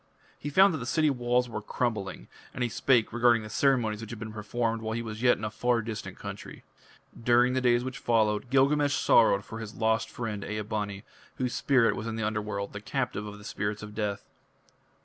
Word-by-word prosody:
He 145 - -4
found 190 +5 +5
that 160 - -3
the 120 - -5
city 155 +2 +2
walls 125 -1 +1
were 110 -2 -5
crumbling, 105 -3 -3 0.3
and 125 - -1
he 120 - 0
spake 120 -1 +2
regarding 120 -1 +4
the 110 - -8
ceremonies 115 -5 +2
which 115 - -8
had 115 - -6
been 110 0 -7
performed 115 +2 -2
while 110 0 -3
yet - - -1
he 115 - -3
was 110 -1 -6
in 125 -3 +3
a 105 - -2
far 120 +1 +1
distant 110 -1 -6
country. - - -8 0.6
During 120 +1 +4
the 130 - +1
days 120 -1 +3
which 130 -1 -5
followed 110 0 +1
Gilgamesh 145 +2 +3
sorrowed 100 -3 +4
for 110 - -7
his 110 -1 -7
lost 110 0 +1
friend 105 -4 -4
Ea 105 0 -3
bani, 105 -1 -4 0.3
whose 125 -1 -2
spirit 130 -5 +3
was 115 -1 -5
in 115 - -3
the 110 -1 -2
Underworld, 105 -1 -3
the 100 - -6
captive 120 -3 -3
of 105 0 -8
the 105 - -13
spirits 105 0 -3
of 105 0 -8
death. 105 -2 -3
115 Hz, 210 wpm, -28 LUFS, 105-125 Hz, 0.6 s, found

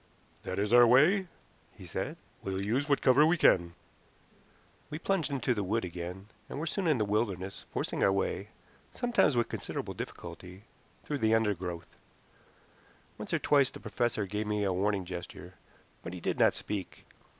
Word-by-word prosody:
"That - - -5
is 105 +3 0
our 120 0 +8
way," 165 +11 +5 0.5
he - - -11
said. - - -4 0.2
"We'll 95 0 -3
use 130 +8 0
what 140 - +2
cover 130 +3 +6
we 165 +3 +4
can." 85 - +4 1.1
We 150 - -4
plunged 180 -2 0
into 130 -3 0
the 105 -3 -2
wood 110 +3 0
again, 90 +2 -6 0.2
and - - -6
were 160 - -2
soon 180 +2 -1
in 155 -4 +3
the 110 - +1
wilderness, 100 -3 -2
forcing - - -2
our - - +5
way, 100 +1 -1 0.5
sometimes 240 - +2
with 120 - +2
considerable - - -4
difficulty, 90 +2 -8 0.4
through 145 -1 -3
the 110 -1 +3
undergrowth. 95 -6 -2 1.2
Once - - -6
or - - +3
twice 140 -3 +3
the - - -11
professor 110 -1 -1
gave 105 +2 -3
me 105 -1 0
a 95 -2 +1
warning 100 0 0
gesture, 90 0 -8 0.5
but 85 - -7
he 90 - -6
did - - -2
not - - +5
speak. 100 -4 -6
105 Hz, 170 wpm, -30 LUFS, 95-135 Hz, 1.2 s, our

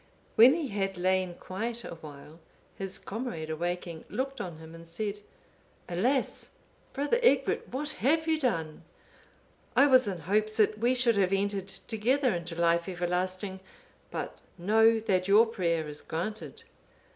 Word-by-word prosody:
When 245 +6 +8
he 320 -5 -3
had 195 -2 -2
lain 185 0 +1
quiet 225 +7 -4
awhile, 155 -1 -10 0.4
his 195 -1 -3
comrade 200 -8 -5
awaking, 170 0 -3
looked 270 +1 -3
on 175 -3 -6
him, 160 0 -12
and 165 0 -12
said, 205 +5 -4 0.7
"Alas! 245 +10 0 0.4
Brother 290 - 0
Egbert, 485 - +3
what 290 +4 -3
have 320 +5 +3
you 320 -1 +2
done? 165 - -1 0.9
I 280 - +7
was 255 -4 +5
in 185 -4 -3
hopes 215 +5 0
that 215 -1 +3
we 245 +3 +2
should 240 -3 +3
have 190 -2 +3
entered 195 -1 0
together 240 +6 0
into 170 -1 -4
life 170 +1 +2
everlasting; 185 +2 -2 0.5
but - - -5 0.2
know 220 +5 +4
that 185 -4 +1
your 210 +3 +7
prayer 170 -8 -1
is 150 0 -7
granted." 215 - -5
195 Hz, 145 wpm, -29 LUFS, 175-235 Hz, 0.9 s, When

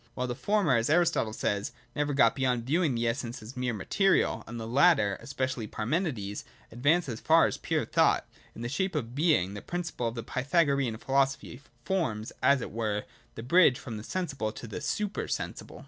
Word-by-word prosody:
While 125 - -1
the 125 - -2
former, 195 - +2
as 115 +3 0
Aristotle 170 -8 +2
says, 105 +1 -2 0.2
never 145 -1 0
get 115 -5 +5
beyond 125 -3 0
viewing 155 0 +1
the 115 0 0
essence 120 0 -2
of 110 - -11
things 125 0 -4
as 120 - 0
material 195 - +2
(uXij), - - -16
and 115 +1 -6
the 110 - -5
latter, 125 - +4
especially 130 -4 -3
Parmenides, 110 - -2 0.3
advanced 145 +8 +2
as 115 -4 -4
far - - +5
as - - -1
pure - - -1
thought, - - +2 0.3
in 115 - -7
the - - -2
shape 185 +8 -2
of 120 -5 -3
Being, 140 - +2
the 100 - -7
principle 170 -9 -3
of 115 - -4
the 115 - -4
Pythagorean 140 -2 +1
philosophy 135 0 0 0.2
forms, 115 - -1
as 140 -2 +4
it - - -5
were, 105 -2 -2 0.3
the 115 - -7
bridge 140 -1 +5
from 115 -3 -7
the 105 - -7
sensible 140 -8 -3
to 115 - -9
the 115 +6 -6
super 200 +8 -2
sensible. - - -5
125 Hz, 195 wpm, -29 LUFS, 115-155 Hz, 0.3 s, get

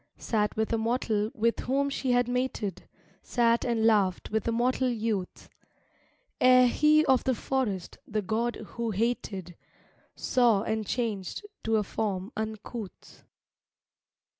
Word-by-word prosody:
Sat 210 -2 -1
with 220 +1 -1
a 225 - +1
mortal 220 -2 0
with 230 +1 +1
whom 275 +2 0
she 265 -2 -1
had 245 0 +3
mated, 245 -7 -3 0.3
Sat 235 -1 +2
and 230 -2 +1
laughed 205 -5 +2
with 220 +1 -1
a - - +2
mortal 250 +2 +1
youth, 220 -5 -3 0.9
Ere 255 0 +7
he 305 +5 +4
of 260 -1 +3
the 260 - +1
forest, 215 -7 -2
the 215 -1 -2
god 230 +5 -1
who 230 +2 -5
hated, 200 -5 -2 0.6
Saw 235 -5 +2
and 220 -2 -2
changed 225 - -3 0.2
to 225 0 +1
a 215 - +2
form 200 0 -3
uncouth.... 220 -1 -7
225 Hz, 135 wpm, -28 LUFS, 210-245 Hz, 0.9 s, Ere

